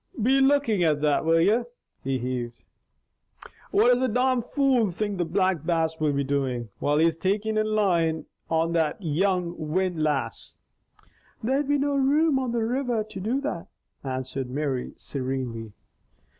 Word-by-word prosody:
"Be 260 +5 +3
lookin' 270 -7 +3
at 155 -3 +3
that, 150 0 +2
will 165 0 +4
ye?" 205 +8 +4 0.4
he 135 0 0
heaved. 125 -1 -4 1.1
"What 225 +4 +4
does 245 - +3
the 260 - +2
domn 250 +2 +2
fool 255 -3 +2
think 200 +2 -3
the 175 - +1
Black 185 -1 +1
Bass 160 -1 0
will 155 -1 +2
be 140 0 0
doin' 130 -4 -2
while 145 +1 +1
he 160 - +4
is 165 -1 +1
takin' 205 +4 0
in 215 0 +1
line 175 -7 +1 0.2
on 165 +1 +1
that 160 -3 +1
young 180 +1 0
windlass?" 155 -6 -1 0.9
"There'd 270 +5 +1
be 290 0 +2
no 285 +1 0
room 280 +2 +3
on 255 -2 -2
the 235 -1 0
river 240 -1 0
to 215 -2 -9
do 235 +8 -1
that," 225 - -4 0.4
answered 130 -1 -4
Mary 135 -1 -2
serenely. 130 -5 -4
175 Hz, 155 wpm, -26 LUFS, 145-230 Hz, 1.1 s, will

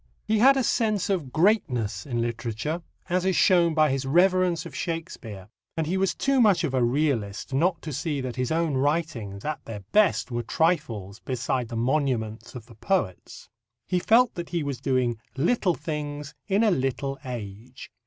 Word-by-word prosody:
He 215 0 +1
had 270 +4 +6
a 265 - +2
sense 215 -5 +1
of 160 -9 -2
greatness 155 - +1
in 120 -3 -1
literature, 120 +7 -3 0.3
as 180 +1 0
is 190 -1 +1
shown 170 -3 +4
by 155 -2 +4
his 135 0 -1
reverence 180 +4 +3
of - - -9
Shakespeare, 115 - -5 0.3
and 160 - 0
he 175 +5 -1
was 190 -1 +1
too 275 -2 +2
much 205 -6 +4
of 145 -5 -1
a 130 -2 +2
realist 120 -5 -1
not 170 +6 +1
to 155 - -5
see 150 +1 -2
that 130 -2 -4
his 130 +1 -2
own 165 -2 +1
writings 135 -8 -1
at 150 -2 -3
their 105 -3 -7
best 210 -10 +3
were 120 0 -1
trifles 115 - -1
beside 125 -1 -2
the 115 - -7
monuments 120 -3 -1
of 120 -3 -8
the 115 - -15
poets. 110 - -2 0.4
He 180 - +1
felt 230 +5 +4
that 175 -2 -6
he 170 -3 -1
was 140 -3 -4
doing 125 -4 0 0.2
little 180 - +2
things 150 -1 -5
in 200 +2 +2
a 215 - +4
little 135 -1 -1
age. 120 0 -8
145 Hz, 180 wpm, -26 LUFS, 120-175 Hz, 0.4 s, had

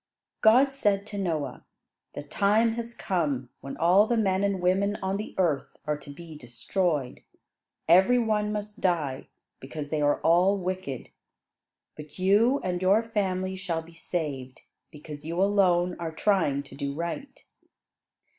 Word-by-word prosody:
God 255 +5 +5
said 205 -6 +1
to 210 -1 -7
Noah, 155 -8 -3 0.5
"The - - -5
time 210 +9 +2
has 235 0 -6
come 145 -9 -2
when 135 - -8
all 185 +6 +4
the 235 - +1
men 195 -3 +1
and 200 -1 0
women 190 +3 +1
on 190 -1 -2
the 210 - -7
earth 160 -8 0
are 150 0 0
to 145 - -13
be 160 +2 -10
destroyed. 145 +2 -2 0.7
Every 190 +9 +6
one 215 -3 0
must 210 +1 -5
die, 160 -8 -1 0.3
because 145 +2 -7
they 155 -1 0
are 145 0 +2
all 180 +4 +4
wicked. 185 -8 -5 0.8
But 150 -1 -11
you 210 +9 +3
and 180 -1 -2
your 195 +5 +4
family 190 -4 -2
shall 175 -4 -3
be 165 +1 -16
saved, 145 -6 -5 0.3
because 150 -1 -10
you 165 +3 -4
alone 185 -3 +3
are 165 -1 -4
trying 160 -6 +1
to 140 - -14
do 140 0 -4
right." 170 - -6
185 Hz, 150 wpm, -27 LUFS, 150-205 Hz, 0.8 s, Every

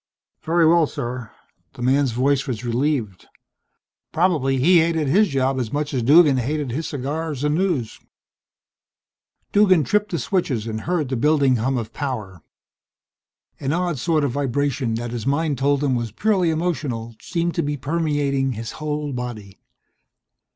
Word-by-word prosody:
"Very 165 +1 +2
well, 165 -1 +4
sir." 120 -2 -5 0.4
The 125 -3 -7
man's 135 +1 +2
voice 135 +4 +1
was 125 -2 -4
relieved. 120 -5 -1 0.8
Probably 155 -6 +1
he 170 +7 +5
hated 160 -2 +1
his 200 +10 +4
job 135 -2 0
as 120 -4 -3
much 145 0 -2
as 130 - 0
Duggan 145 +2 +6
hated 140 +2 -2
his 155 +7 -3
cigars 145 +1 -4
and 150 0 +1
news. 160 - -1 1.5
Duggan 190 -6 +4
tripped 210 +8 +1
the 170 - -2
switches 145 - -1
and 110 -1 -4
heard 165 -7 0
the 130 - -1
building 140 0 +3
hum 130 +4 0
of 115 -1 -5
power. 110 - -5 1.2
An 140 +2 -1
odd 175 -4 -1
sort 155 +3 +1
of 140 - 0
vibration 135 -2 -1
that 120 +1 -4
his 120 -1 -4
mind 145 -1 0
told 140 +1 +1
him 135 -3 +1
was 120 -3 -2
purely 190 - +1
emotional, 145 -9 -2
seemed 170 -1 -2
to 170 - 0
be 145 -1 -2
permeating 145 -3 0
his 115 0 -6
whole 150 -1 -3
body. 115 -6 -6
140 Hz, 155 wpm, -22 LUFS, 125-160 Hz, 1.5 s, Duggan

